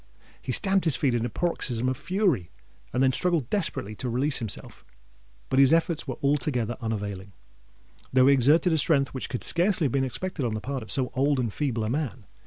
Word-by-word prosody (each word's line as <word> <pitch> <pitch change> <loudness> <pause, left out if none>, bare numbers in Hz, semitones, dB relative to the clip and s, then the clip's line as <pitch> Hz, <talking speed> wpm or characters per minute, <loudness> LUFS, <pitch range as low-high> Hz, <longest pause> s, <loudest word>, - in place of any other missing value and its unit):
He - - -4
stamped 195 - +2
his 160 -5 +3
feet 135 -4 +1
in 120 0 0
a - - -7
paroxysm 125 -4 -1
of 130 - 0
fury, 180 - 0 0.4
and 125 +2 +1
then 130 - +4
struggled 165 -3 0
desperately 160 - -2
to 125 - -3
release 135 +4 0
himself: 110 -4 -7 0.6
but 130 - +1
his 135 -1 +6
efforts 165 -1 +1
were - - -4
altogether 125 -5 0
unavailing—though 100 - -4
he 140 - +6
exerted 150 +7 +4
a 160 - +2
strength 140 -2 +3
which 130 - -4
could 125 - -3
scarcely 175 -1 +2
have 135 - 0
been 135 +1 +1
expected 150 +4 -4
on 115 -3 -1
the - - -2
part 135 +3 -4
of 110 - -7
so 130 -2 +1
old 140 +1 +1
and 115 -5 -2
feeble 125 -7 -1
a 110 - -2
man. 130 -6 -3
130 Hz, 200 wpm, -26 LUFS, 120-155 Hz, 0.6 s, his